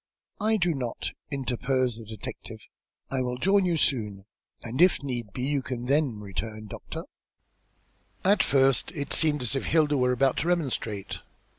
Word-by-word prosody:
"I 220 +1 +2
do 175 -3 +2
not," 125 -5 -3 0.2
interposed 130 -3 -1
the - - -10
detective. 110 -1 -8 0.5
"I 135 -1 +1
will 125 0 -2
join 195 +6 +3
you 170 -2 +1
soon, 105 -9 0 0.4
and 120 +6 -2
if 180 -5 +5
need 120 -6 -4
be, 125 - -4
you 140 +1 +1
can 125 -1 -5
then 135 -4 +1
return, 105 +2 -5
doctor." 105 - -7 1.2
At 195 +1 +5
first 135 -2 +3
it 145 -4 -2
seemed 150 -4 +4
as 125 +3 -1
if 135 - -1
Hilda 155 -2 +3
were 125 -1 +3
about 135 +1 +2
to 160 - -1
remonstrate. 130 - -1
130 Hz, 160 wpm, -27 LUFS, 120-150 Hz, 1.2 s, if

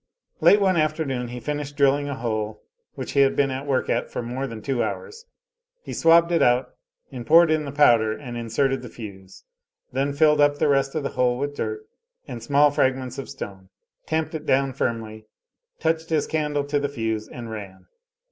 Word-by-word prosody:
Late 205 - +6
one 190 -3 +2
afternoon 155 -5 -1
he 125 +1 -7
finished 145 +1 -4
drilling 145 0 +3
a 140 - -3
hole 110 -3 -3 0.3
which - - -5
he - - +1
had 135 -1 +4
been 140 -1 +2
at 135 +2 -5
work 135 -2 0
at - - -1
for - - -4
more 125 +3 -4
than 115 -3 -7
two 135 -3 -1
hours; 460 0 -5 0.6
he - - -7
swabbed 170 +1 +5
it 170 - +2
out, 125 +1 +3 0.4
and 125 -3 -6
poured 165 +5 +6
in 155 -1 +1
the 140 - -5
powder 120 -7 +4
and 120 +2 -7
inserted 125 +4 0
the 125 - -9
fuse; 95 -5 -11 0.5
then 135 +2 0
filled 150 +1 +4
up 145 0 +4
the - - +2
rest 135 0 +1
of 155 - -1
the 140 - -2
hole 125 -1 +1
with 145 +2 -3
dirt 425 - -4 0.4
and 125 -4 -7
small 145 +4 +4
fragments 130 -3 0
of 135 - -7
stone; 95 -2 -8 0.4
tamped 160 0 -1
it 155 -1 -6
down 135 0 +2
firmly, 110 -4 -3 0.5
touched 160 0 -1
his 155 -2 +1
candle 150 -2 -1
to 145 +1 -1
the 145 0 -2
fuse, 110 -5 -3
and 115 -2 -8
ran. 100 -4 -9
135 Hz, 195 wpm, -24 LUFS, 120-150 Hz, 0.6 s, Late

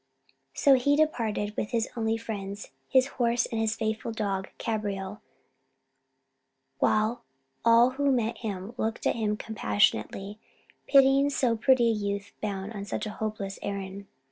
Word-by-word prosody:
So 280 - +5
he 270 +2 +3
departed 225 -9 0
with 210 - -2
his 230 -2 0
only 225 -1 0
friends 205 -3 -6 0.2
his 260 -1 +5
horse 240 -2 +1
and 225 -1 -2
his 220 0 0
faithful 220 +1 -2
dog 200 -4 -2
Cabriole; 205 -2 -3 1.6
while 215 +3 +2 0.4
all 230 +2 +6
who 280 +1 +1
met 235 -3 0
him 205 -1 -5
looked 225 -1 -2
at - - +2
him 210 -2 -1
compassionately, 195 - 0 0.5
pitying 275 0 +5
so 250 -4 +1
pretty 240 +1 +4
a - - +1
youth 200 -1 -3
bound 200 0 -3
on 200 -2 -5
such 200 - -4
a 215 - -4
hopeless 210 -2 -4
errand. 200 0 -5
220 Hz, 140 wpm, -28 LUFS, 200-240 Hz, 1.6 s, all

